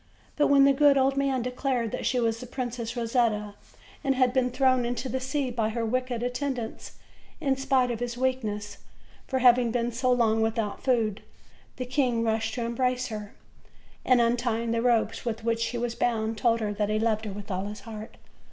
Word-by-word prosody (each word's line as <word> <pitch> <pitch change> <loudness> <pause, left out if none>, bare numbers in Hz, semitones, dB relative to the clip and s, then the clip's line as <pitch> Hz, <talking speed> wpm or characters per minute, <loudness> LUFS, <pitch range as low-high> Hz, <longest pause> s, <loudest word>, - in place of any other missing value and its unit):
But 295 - +3
when 280 -1 +6
the 275 - +5
good 285 0 +5
old 270 0 +3
man 275 -3 0
declared 250 -2 -1
that - - -2
she 250 - +1
was 230 -1 0
the 250 - -8
Princess 240 -1 -4
Ro 240 - -1
setta, 225 -3 0 0.5
and 270 -2 +1
had 255 -1 +3
been 260 -1 +2
thrown 255 0 +2
into 245 +2 -3
the 260 - -1
sea 265 0 -2
by 225 -2 0
her 230 +1 -2
wicked 250 0 -1
at 245 0 -1
tendants, 250 -4 -4 0.5
in 275 -2 +1
spite 265 -2 +1
of 230 - -3
his 245 0 -4
weakness 215 -6 -2 0.5
from 260 -1 -1
having 245 -1 +5
been 235 +1 -1
so 250 +2 0
long 225 -3 +3
without 220 -2 -1
food, 230 -5 +1 0.5
the 255 - -4
king 250 -3 +1
rushed 220 0 0
to 240 -2 -2
embrace 250 +1 -1
her, 210 -2 -7 0.7
and, 255 -1 +4
untying 235 -1 +1
the 230 0 +1
ropes 235 -2 +1
with 230 -2 -3
which 230 0 0
she 230 +1 -1
was 235 0 -2
bound, 225 -2 0
told 230 +1 +1
her 210 -1 -1
that 205 0 -1
he 215 - +1
loved 220 0 0
her 210 - -4
with 205 +1 -8
all 185 +1 -2
his 210 +1 -7
heart. 220 -1 -9
240 Hz, 205 wpm, -27 LUFS, 225-255 Hz, 0.7 s, when